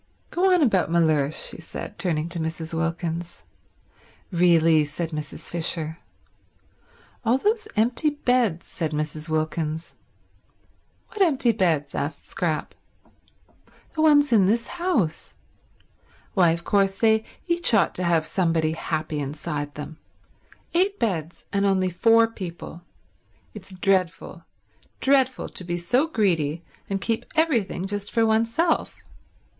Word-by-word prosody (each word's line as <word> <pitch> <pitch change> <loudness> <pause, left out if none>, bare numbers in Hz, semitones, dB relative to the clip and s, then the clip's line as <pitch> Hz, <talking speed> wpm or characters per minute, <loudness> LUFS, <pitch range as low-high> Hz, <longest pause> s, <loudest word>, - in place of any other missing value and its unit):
Go 375 +2 +2
on 360 -3 +4
about 195 - +2
Mellersh," 155 -3 +2
she - - -10
said, 160 - -8
turning 160 -3 0
to 170 0 -2
Mrs. 160 0 -4
Wilkins. 165 +1 -3 0.9
"Really—" 165 -3 +4
said 155 +3 -4
Mrs. 150 -1 -6
Fisher. 165 -1 -2 1.2
"All 240 +2 +3
those 430 - 0
empty 235 +7 +2
beds," 245 - +1
said 160 -3 -4
Mrs. 150 +1 -4
Wilkins. 155 +1 -2 1.2
"What 425 - -5
empty 275 -9 +4
beds?" 165 -9 0
asked 145 +1 -4
Scrap. 160 -4 -2 1.2
"The 315 - -1
ones 290 -3 +5
in 200 -4 +5
this 230 +3 +1
house. 230 - -1 1.0
Why, 180 -4 +4
of 170 +1 -1
course 195 0 +2
they 220 0 +3 0.2
each 345 -4 +1
ought 195 -6 +3
to 185 - -3
have 170 -2 +2
somebody 165 -4 +1
happy 155 -1 -3
inside 145 +1 -4
them. 150 +1 -8 0.7
Eight 385 +4 +2
beds, 170 - -2
and 200 0 +1
only 190 -2 +2
four 230 +5 +5
people. 175 -6 -8 0.7
It's 195 -2 -10
dreadful, 185 -2 -1 0.5
dreadful 265 -1 +2
to - - -6
be 175 0 -3
so 245 - +1
greedy 170 - 0 0.3
and 195 -1 -1
keep 225 +2 -1
everything 240 - +1
just 205 +1 -4
for 230 -1 +2
oneself. 230 +10 +1
180 Hz, 125 wpm, -24 LUFS, 160-230 Hz, 1.2 s, ones